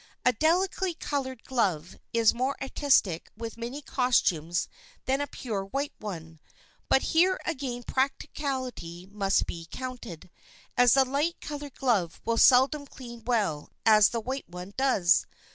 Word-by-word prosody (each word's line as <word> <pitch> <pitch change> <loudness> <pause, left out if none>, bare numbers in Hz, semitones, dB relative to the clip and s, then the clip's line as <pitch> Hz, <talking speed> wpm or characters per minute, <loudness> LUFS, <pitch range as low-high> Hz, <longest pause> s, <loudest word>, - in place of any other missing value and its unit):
A 250 - +5
delicately 355 - +1
colored 260 -6 -4
glove 185 -9 -1 0.2
is 230 -2 +4
more 260 +3 -1
artistic 265 - +1
with 230 0 -6
many 240 +5 -6
costumes 175 - +1 0.4
than 270 +2 +1
a 285 - -2
pure 215 -7 -4
white 275 +9 -3
one, 165 -6 -7 0.5
but 265 - +4
here 365 +3 +4
again 260 -6 -3
practicability 260 - -3
must 195 0 +1
be 165 -1 -7
counted, 245 -10 -7 0.4
as 245 -1 +6
the 270 -1 +5
light 290 +6 -1
colored 290 -2 -7
glove 205 -11 0
will 230 0 +1
seldom 280 +3 +5
clean 235 -4 -11
well 205 -12 0 0.2
and 215 -1 +6
the 230 - +2
white 260 +1 -5
one 180 +3 -8
does. 230 -10 +3
250 Hz, 140 wpm, -28 LUFS, 195-275 Hz, 0.5 s, as